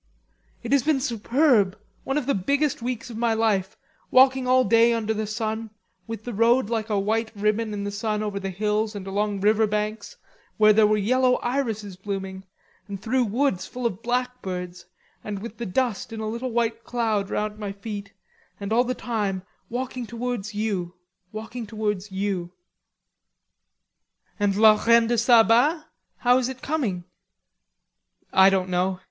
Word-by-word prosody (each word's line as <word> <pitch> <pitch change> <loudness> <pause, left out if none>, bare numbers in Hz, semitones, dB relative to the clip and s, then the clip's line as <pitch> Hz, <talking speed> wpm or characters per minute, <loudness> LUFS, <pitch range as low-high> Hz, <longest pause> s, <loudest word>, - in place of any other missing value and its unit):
"It - - -5
has 280 -1 +5
been 295 +1 +1
superb, 235 -4 +2 0.3
one 270 +2 -1
of 295 - -1
the 280 - +1
biggest 280 +8 0
weeks 245 0 -4
in 225 - -7
my 230 -1 +2
life, 210 -3 0 0.3
walking 260 0 +5
all 255 0 +5
day 230 0 +4
under 220 -1 -1
the 215 0 -3
sun, 220 +1 -3 0.4
with 225 -2 -6
the 245 - -5
road 230 +2 +3
like 225 -1 -1
a 210 - +1
white 220 +3 0
ribbon 215 +2 0
in 205 -1 -4
the 205 - -3
sun 215 +1 -2
over 205 -2 -3
the 195 0 -4
hills 210 +3 -1
and 195 -2 -6
along 200 0 -1
river 215 +2 +3
banks, 210 +1 -3 0.4
where 215 -1 +6
there 215 0 +5
were 215 0 +2
yellow 250 +4 +3
irises 225 -7 -2
blooming, 190 -1 -5 0.4
and 200 -1 -6
through 245 +5 +1
woods 220 -4 0
full 250 -1 -6
of 225 -3 -1
blackbirds, 215 -8 -3 0.4
and 210 -1 -4
with 225 +3 -8
the 235 - -3
dust 230 +1 -1
in 225 - -6
a 220 - -3
little 235 +4 -3
white 230 -1 -1
cloud 220 -5 -1
round 210 0 -2
my 205 -2 -4
feet, 200 0 -7 0.5
and 200 +1 -3
all 240 +2 +4
the 255 0 -2
time 205 -6 -2 0.3
walking 250 0 -4
towards 235 -3 -4
you, 195 -5 -2 0.4
walking 220 +2 -6
towards 210 -2 -3
you." 190 -3 -2 1.9
"And 205 -1 +1
la 215 0 +5
Reine 230 0 +5
de 240 +1 0
Saba, 245 +7 +4 0.3
how 245 +1 +4
is 255 0 -1
it 260 -1 -8
coming?" 240 - -1 1.3
"I 190 0 +7
don't 190 -1 0
know. 180 +1 0
220 Hz, 165 wpm, -24 LUFS, 200-240 Hz, 1.9 s, I